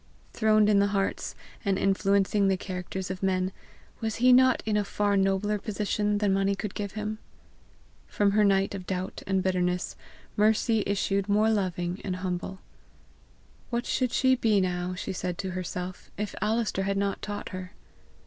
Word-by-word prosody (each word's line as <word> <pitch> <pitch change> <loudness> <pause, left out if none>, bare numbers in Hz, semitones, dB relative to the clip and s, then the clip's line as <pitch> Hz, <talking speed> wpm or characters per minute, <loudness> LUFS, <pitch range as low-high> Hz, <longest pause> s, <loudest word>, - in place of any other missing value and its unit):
Throned 215 -1 +4
in 205 -1 +5
the 200 - +4
hearts, 195 - -2 0.3
and 200 -3 +1
influencing 195 +1 +2
the 190 -1 +2
characters 185 0 -5
of 185 - -6
men, 185 -1 +1 0.5
was 220 -2 -2
he 250 +2 +5
not 255 0 +5
in 215 -1 0
a 210 - +2
far 205 0 0
nobler 195 +2 +1
position 210 0 -1
than 205 -2 +2
money 195 +1 +2
could 200 0 -5
give 200 -2 -4
him? 215 0 -4 0.9
From 205 -1 +2
her 210 +1 +4
night 195 -1 +3
of 190 -2 -7
doubt 185 0 -3
and 190 -1 +1
bitterness 180 -1 0 0.4
Mercy 220 +1 +3
issued 200 0 0
more 215 +2 +4
loving 180 -3 -1
and 185 -2 -2
humble. 185 +1 -4 1.1
What 240 0 -1
should 255 -2 0
she 260 +1 +3
be 225 -5 +3
now, 180 -1 -1
she 185 - -4
said 180 -1 -3
to 190 -1 -3
herself, 180 0 -5
if 210 -1 -3
Alister 215 -1 0
had 195 +1 0
not 200 0 -1
taught 205 -1 -5
her? 185 0 -7
200 Hz, 170 wpm, -28 LUFS, 185-210 Hz, 1.1 s, in